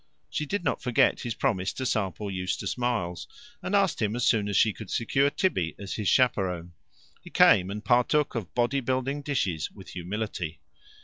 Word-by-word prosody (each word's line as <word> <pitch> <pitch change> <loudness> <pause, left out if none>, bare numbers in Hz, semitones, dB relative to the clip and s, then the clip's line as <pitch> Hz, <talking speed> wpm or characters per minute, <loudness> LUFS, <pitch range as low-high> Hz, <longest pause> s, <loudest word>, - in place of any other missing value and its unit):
She 150 - -2
did 200 +4 -2
not - - -1
forget 125 -2 +3
his 120 -2 -4
promise 100 -8 0
to 130 - -4
sample 100 -3 -1
Eustace 90 0 -2
Miles, 115 -9 -2 0.3
and 205 - -1
asked 190 -9 +2
him 105 0 0
as 120 - 0
soon 105 -4 +3
as 100 - +1
she 110 - +4
could 110 -4 -10
secure 135 +4 +2
Tibby 145 - 0
as 100 -1 -6
his 105 -3 -3
chaperon. 90 -9 +1 0.5
He - - -12
came, 90 0 +5
and 105 +1 -6
partook 125 +4 +3
of 110 -8 -5
body 125 +3 +2
building 130 +2 -1
dishes 95 - -1
with 95 -3 -13
humility. 90 -2 -4
110 Hz, 180 wpm, -27 LUFS, 95-130 Hz, 0.5 s, came